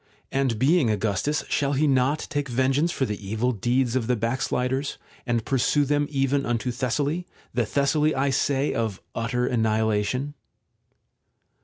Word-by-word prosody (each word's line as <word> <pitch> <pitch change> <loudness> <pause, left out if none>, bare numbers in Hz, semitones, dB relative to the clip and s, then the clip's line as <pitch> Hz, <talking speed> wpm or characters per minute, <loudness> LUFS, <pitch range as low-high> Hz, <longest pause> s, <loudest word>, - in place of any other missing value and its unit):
And 135 -4 0
being 140 +1 +3
Augustus 110 +8 0
shall 140 0 0
he 145 +3 +2
not 135 +1 +2
take 145 -3 -2
ven 130 +2 +1
geance 155 +5 +2
for 135 - 0
the 105 -3 -5
evil 110 +5 0
deeds 120 +3 0
of 120 -4 0
the 125 - +2
backsliders, 125 +4 -1 0.3
and 120 -1 0
pursue 135 +2 +2
them 145 +1 +1
even 135 0 +1
unto 120 0 -1
Thessaly, 140 +8 -1 0.3
the 120 -2 0
Thessaly, 150 +4 +2
I 135 +1 +1
say, 135 +1 +1
of 110 -4 -2
utter 125 +2 -1
annihilation 110 +3 0
130 Hz, 150 wpm, -25 LUFS, 115-140 Hz, 0.3 s, being